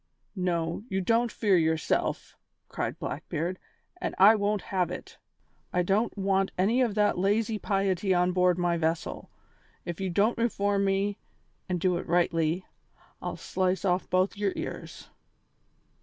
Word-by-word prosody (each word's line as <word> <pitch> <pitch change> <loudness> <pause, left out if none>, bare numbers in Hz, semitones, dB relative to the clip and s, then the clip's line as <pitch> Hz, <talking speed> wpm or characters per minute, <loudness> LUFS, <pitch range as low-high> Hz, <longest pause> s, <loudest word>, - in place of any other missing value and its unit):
"No, 170 -3 -1
you 190 - 0
don't 230 +5 +2
fear 205 -4 +2
yourself," 160 -2 0 0.3
cried - - -3
Blackbeard, 170 +4 -4 0.4
"and - - -2
I 200 +3 +8
won't 205 -2 0
have 180 -3 +2
it; 180 - -8 0.5
I 180 - +1
don't 205 +5 0
want 195 0 +1
any 220 +8 +3
of 230 -5 +1
that 210 -3 +2
lazy 215 +3 +1
piety 195 -1 0
on 180 0 +3
board 180 -1 +3
my 175 -1 +1
vessel. 165 0 -2 0.6
If 175 +1 -5
you 190 - -1
don't 205 +7 +2
reform 200 -3 +1
me, 195 +1 0 0.5
and 180 -1 0
do 180 0 +1
it - - -6
rightly, 170 0 +1 0.6
I'll - - -4
slice 185 +1 -1
off 180 0 +1
both 185 +1 +2
your 200 -1 -1
ears." - - -7
190 Hz, 145 wpm, -28 LUFS, 175-205 Hz, 0.6 s, I